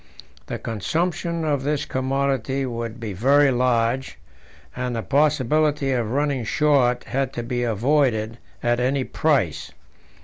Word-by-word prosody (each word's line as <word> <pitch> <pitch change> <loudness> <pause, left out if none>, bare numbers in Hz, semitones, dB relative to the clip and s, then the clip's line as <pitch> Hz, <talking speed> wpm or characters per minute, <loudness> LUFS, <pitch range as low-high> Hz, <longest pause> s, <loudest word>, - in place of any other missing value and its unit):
The - - -4
consumption 165 - -2
of 145 -3 0
this 145 +1 -1
commodity 135 0 -1
would 115 -1 -5
be 110 -3 -5
very 135 +8 +4
large, 125 0 0 0.6
and 125 -1 -3
the 115 - -3
possibility 145 0 +2
of 120 -4 0
running 140 0 0
short 125 -1 +2
had 135 0 -2
to 120 - -4
be 120 +1 -2
avoided 120 -1 +1 0.2
at 120 0 +1
any 130 +2 +1
price. 135 - 0
130 Hz, 130 wpm, -23 LUFS, 120-145 Hz, 0.6 s, very